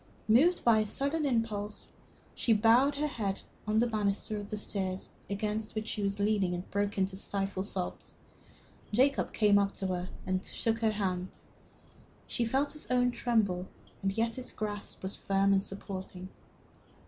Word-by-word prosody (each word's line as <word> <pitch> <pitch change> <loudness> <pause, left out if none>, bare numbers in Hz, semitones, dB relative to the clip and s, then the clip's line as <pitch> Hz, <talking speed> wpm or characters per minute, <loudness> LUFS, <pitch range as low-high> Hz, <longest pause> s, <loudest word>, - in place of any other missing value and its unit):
Moved 285 +12 +5
by 230 -2 +6
a 215 - +2
sudden 285 +6 0
impulse, 215 -4 -2 0.4
she 230 - +2
bowed 235 +6 +5
her 295 +2 0
head 210 -9 -2 0.3
on 215 0 +2
the 230 - +5
banister 210 -1 0
of 205 - -7
the 215 - -3
stairs 190 -2 -3 0.2
against 210 +2 -2
which 215 0 -2
she 210 - -2
was 200 0 -1
leaning 200 -3 +2
and 175 +1 -6
broke 205 0 0
into 190 0 +1
stifled 195 0 -2
sobs. 185 -3 -5 0.8
Jacob 260 +6 +3
Delafield - - -21
came 205 -2 +5
up 200 0 0
to 195 - -2
her 180 -1 -2 0.2
and 185 0 0
took 225 +3 -1
her 220 -1 +2
hand. 185 -3 -2 0.9
She 240 - 0
felt 270 +5 +1
his 300 - -2
own 250 -1 +3
tremble, 205 -8 +1 0.3
and 195 - +1
yet 230 +2 0
its 255 - -8
grasp 205 -2 -5
was 190 - -2
firm 195 0 +2
and 195 - +4
supporting. 190 -2 -6
210 Hz, 170 wpm, -31 LUFS, 195-230 Hz, 0.9 s, by